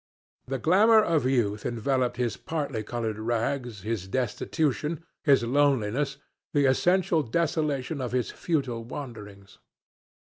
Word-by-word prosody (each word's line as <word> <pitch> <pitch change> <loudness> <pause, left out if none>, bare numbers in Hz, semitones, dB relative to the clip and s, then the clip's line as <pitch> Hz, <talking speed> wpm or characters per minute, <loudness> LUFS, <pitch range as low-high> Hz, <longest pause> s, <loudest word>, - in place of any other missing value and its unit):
The 135 +1 -2
glamour 205 - +5
of 160 -9 +1
youth 110 -5 +1
enveloped 125 +2 0
his 120 -2 -1
particolored 120 -7 -3
rags, 120 0 -2
his 110 -4 -3
destitution, 150 - -1 0.2
his 140 -5 +4
loneliness, 135 +1 +1 0.4
the 145 -1 +4
essential 175 +5 +3
desolation 150 0 -1
of 125 - -3
his 125 -1 -1
futile 135 -9 -2
wanderings. 105 -6 -9
130 Hz, 110 wpm, -27 LUFS, 115-145 Hz, 0.4 s, glamour